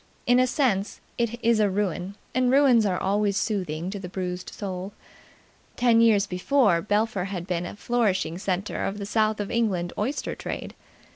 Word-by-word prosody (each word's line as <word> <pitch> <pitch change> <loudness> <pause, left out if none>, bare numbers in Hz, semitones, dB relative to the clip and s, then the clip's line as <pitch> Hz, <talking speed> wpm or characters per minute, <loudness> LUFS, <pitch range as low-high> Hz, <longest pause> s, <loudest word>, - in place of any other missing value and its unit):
In 245 +1 +4
a 255 - +4
sense, 240 -8 0 0.2
it 235 0 -1
is 230 -1 +4
a 210 -1 +3
ruin, 190 -1 -2 0.2
and 255 0 +2
ruins 260 -6 +5
are 185 -2 0
always 200 +1 +1
soothing 180 -5 -2
to 200 - -5
the 180 -2 -7
bruised 180 -1 -4
soul. 190 -1 -6 0.8
Ten 235 -2 +4
years 215 -4 +4
before, 185 -1 +2
Belpher 205 -1 0
had 185 -3 -5
been 175 -2 -2
a - - -8
flourishing 200 -7 0
centre 190 +1 -2
of 195 - -2
the 200 - -5
South 215 +1 +1
of 205 - -3
England 195 -7 0
oyster 250 +8 -2
trade. - - -6
205 Hz, 170 wpm, -25 LUFS, 185-230 Hz, 0.8 s, ruins